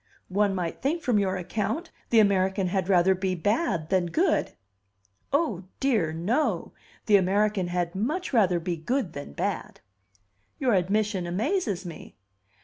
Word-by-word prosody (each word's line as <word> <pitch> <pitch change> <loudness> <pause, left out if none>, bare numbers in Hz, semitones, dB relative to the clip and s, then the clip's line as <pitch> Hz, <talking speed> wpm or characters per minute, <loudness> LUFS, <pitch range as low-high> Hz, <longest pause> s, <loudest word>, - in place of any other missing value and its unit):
"One 200 +1 +1
might 175 -3 -3
think, 315 +5 -1
from 235 -5 +2
your 190 -2 0
account, 215 - -3 0.2
the 230 - +5
American 190 -2 +2
had 190 0 -1
rather 190 0 +5
be 185 0 -1
bad 190 - 0
than 185 -2 +2
good." 335 - +1 0.8
"O 275 - 0
dear, 225 -13 +1
no! 200 - -1 0.3
The 210 -3 +6
American 195 0 +1
had 175 -1 -1
much 295 - -2
rather 190 -7 +3
be 170 0 -3
good 240 - -2
than 140 - -7
bad!" - - -3 0.8
"Your 255 -4 +1
admission 195 0 +1
amazes 210 - -1
me!" 170 -2 -9
195 Hz, 145 wpm, -26 LUFS, 180-230 Hz, 0.8 s, The